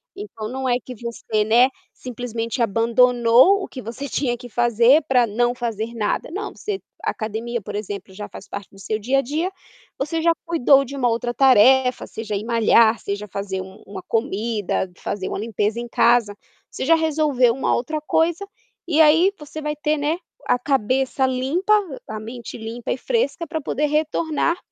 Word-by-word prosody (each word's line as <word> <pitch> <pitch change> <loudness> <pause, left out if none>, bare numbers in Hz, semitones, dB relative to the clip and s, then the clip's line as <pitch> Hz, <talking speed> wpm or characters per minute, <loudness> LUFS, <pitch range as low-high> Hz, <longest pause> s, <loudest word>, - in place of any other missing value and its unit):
Então 305 - -7
não 260 +2 -3
é 245 - +3
que 250 - -9
você, 225 -2 -2
né, 240 +4 +5 0.2
simplesmente 240 -1 -5
abandonou 240 - +4
o - - -5
que 255 - -8
você 235 +6 -6
tinha 245 -3 -1
que 245 - -10
fazer 240 +5 +4
para 250 -2 +4
não 240 +3 0
fazer 230 -1 -3
nada, 210 +5 -1
não 415 +4 -4
você 410 -2 -4 0.2
a - - 0
academia 225 +2 -3
por 205 +1 -8
exemplo 205 -2 -6
já 205 +1 -7
faz 190 - -11
parte 200 -1 -7
do 195 - -17
seu 215 +3 -3
dia 260 +6 +1
a - - +4
dia, 315 +9 -2 0.5
você 320 +4 -2
já 335 0 +4
cuidou 275 -4 +4
de 280 +3 -8
uma 250 -3 +1
outra 240 +1 -1
tarefa 260 0 +5
seja 220 -2 -5
ir 205 +3 -3
malhar, 230 -1 +4
seja 205 +1 -4
fazer 195 0 -4
um 190 +1 -12
uma 195 -2 -8
comida, 220 -3 -1
fazer 190 -2 -4
uma - - -4
limpeza 215 +1 -1
em 240 - -5
casa, 230 -3 +3 0.3
você - - -5
já 330 - +5
resolveu 300 -6 +2
uma 270 - 0
outra 305 +6 -2
coisa 330 +5 0 0.4
e 320 -1 +3
aí 325 +5 +5
você 300 +1 -8
vai 300 0 -2
ter, 300 +1 0
né, 295 +3 0 0.3
a 245 - +2
cabeça 265 +1 +1
limpa, 270 +11 +1 0.3
a 215 0 -5
mente 235 +2 -8
limpa 225 +1 -6
e - - -1
fresca 335 - -1
para 320 0 -3
poder 295 +1 -1
retornar 310 +2 0
245 Hz, 180 wpm, -22 LUFS, 220-295 Hz, 0.5 s, né